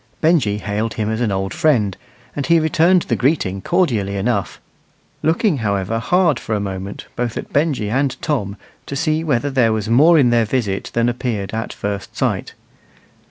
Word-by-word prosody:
Benjy 155 -11 +2
hailed 105 +2 -3
him 110 -1 -1
as 110 +2 -2
an 115 -4 +1
old 95 0 -2
friend, 125 - +2 0.4
and 145 - -2
he 170 0 +5
returned 165 +3 +3
the - - -1
greeting 125 - 0
cordially 115 - 0
enough, 100 0 -1 0.6
looking 165 +2 +2
however 100 0 -1
hard 175 +2 +2
for 110 - -3
a - - -1
moment 100 0 -5
both 120 -1 -2
at - - -7
Benjy 145 -7 +1
and 135 +4 0
Tom, 105 -10 -2 0.3
to 140 - -4
see 155 +2 0
whether 145 -2 0
there 125 -4 +3
was 110 0 -2
more 155 +8 +6
in 125 -5 +4
their 120 -1 +4
visit 105 -4 -2
than 120 0 +2
appeared 120 -5 -2
at 115 0 -3
first 100 -1 -5
sight. - - -1
120 Hz, 175 wpm, -19 LUFS, 105-150 Hz, 0.6 s, more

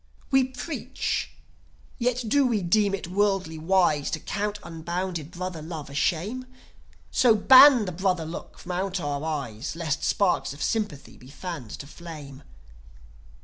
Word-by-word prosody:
We 265 -1 +5
preach; 260 +4 -3 0.7
yet 250 0 0
do 285 +6 +4
we 220 -6 0
deem 200 +3 +3
it 195 - -7
worldly 190 -3 0
wise 165 -4 +2
To 155 - -2
count 210 +3 -3
unbounded 170 -1 -4
brother 180 -2 -5
love 155 -3 -7
a - - -9
shame, 200 - -1 0.6
So, 240 -3 +5
ban 255 +1 +8
the 180 - -3
brother 180 -1 0
look 165 +2 -8
from 180 - -8
out 185 +1 -1
our 145 -2 -3
eyes, 140 -6 -4
Lest 160 -3 -2
sparks 185 -8 +1
of 145 - -6
sympathy 205 -11 -2
be 125 - -15
fanned 155 - -7
to - - -8
flame. 150 -3 -10
180 Hz, 145 wpm, -26 LUFS, 155-205 Hz, 0.7 s, ban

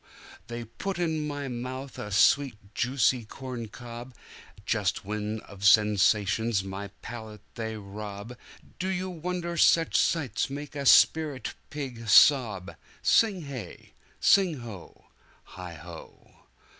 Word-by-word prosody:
"They 120 0 -5
put 190 - -5
in 160 -3 -1
my 145 -1 -4
mouth 130 +2 -6
a 105 - -5
sweet, 130 +5 +4 0.2
juicy 125 0 +1
corncobJust 120 0 -5
when 105 +1 -3
of 100 -1 -13
sensations 105 0 +4
my 95 +1 -6 0.2
palate 110 -3 -8
they 110 -1 -4
rob, 105 +2 -8 0.4
Do 185 - -2
you 185 0 -2
wonder 170 0 -4
such 165 +1 +4
sights 135 -11 +1
make 145 +1 -7
a 140 -1 -2
spirit 150 -3 +4 0.2
pig 130 -7 -6
sob!" 105 -5 +5 0.3
Sing 205 -5 +3
hey! 130 -10 -9 0.3
sing 180 -9 +4
ho! 110 -7 -11 0.4
heigho! 85 -2 -11
120 Hz, 110 wpm, -28 LUFS, 105-145 Hz, 0.4 s, sob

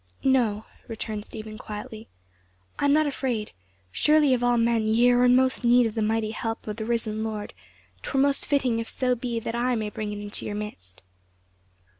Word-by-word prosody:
"No," 235 -6 +2 0.2
returned 215 -2 -5
Stephen 215 0 -9
quietly, 215 +1 -8 0.7
"I - - +1
am 285 - +4
not 310 +1 +4
afraid; 255 -6 -2 0.4
surely 300 - +4
of 245 -1 0
all 245 0 +3
men 230 -1 +2
ye 235 +3 +4
are 245 0 +4
most 255 +1 +3
in 240 - +3
need 245 0 +6
of 225 - -2
the 220 - -2
mighty 215 0 0
help 225 0 -4
of 210 0 -5
the 220 - -4
risen 220 -2 -1
Lord; 215 -2 -5 0.5
'twere 270 - -2
most 280 0 +2
fitting 255 -5 +1
if 230 - -5
so 255 -1 0
be 240 -1 -3
that 225 - -5
I 245 +1 +1
may 215 -2 -3
bring 210 -1 -4
it 210 - -5
into 205 0 -5
your 205 - -4
midst." 95 - -8
230 Hz, 195 wpm, -26 LUFS, 215-250 Hz, 0.7 s, need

